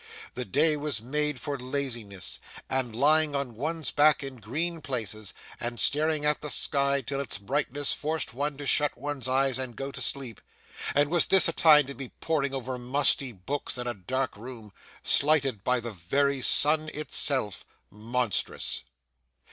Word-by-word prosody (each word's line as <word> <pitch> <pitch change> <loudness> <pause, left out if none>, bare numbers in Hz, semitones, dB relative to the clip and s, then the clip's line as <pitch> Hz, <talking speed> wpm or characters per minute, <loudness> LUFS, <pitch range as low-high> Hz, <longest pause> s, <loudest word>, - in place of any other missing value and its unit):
The 125 - -4
day 150 +9 +2
was 145 -5 -2
made 150 +4 0
for 140 +1 -4
laziness, 125 -7 -3 0.3
and 130 -4 -1
lying 150 +3 +3
on 140 -4 -2
one's 155 +3 -3
back 150 0 +4
in 135 -2 -6
green 155 - -3
places, 110 -7 -3 0.3
and 120 -1 -3
staring 155 0 +3
at 150 0 +1
the 150 - -4
sky 140 -1 +2
till 135 +2 -4
its 140 - -5
brightness 140 +7 -1
forced 155 -2 -2
one 140 +2 -2
to 145 - -6
shut 145 +1 +3
one's 145 -3 -4
eyes 130 0 +1
and 130 -3 -5
go 135 +4 -5
to - - -7
sleep; 130 -6 -4 0.5
and 145 +1 +3
was 175 -2 +5
this 190 - +6
a 165 - +1
time 150 -3 +6
to 140 - -6
be 130 -1 -7
poring 150 -4 0
over 130 -1 -4
musty 135 +1 +2
books 125 +9 -4
in 125 - -4
a 120 - -2
dark 130 +6 -3
room, 110 -1 -10 0.3
slighted 140 -8 +2
by 125 +2 +2
the 120 -1 -6
very 135 +10 0
sun 155 +4 +3
itself? 135 -8 0 0.3
Monstrous! 115 +1 -1
135 Hz, 165 wpm, -28 LUFS, 120-150 Hz, 0.5 s, this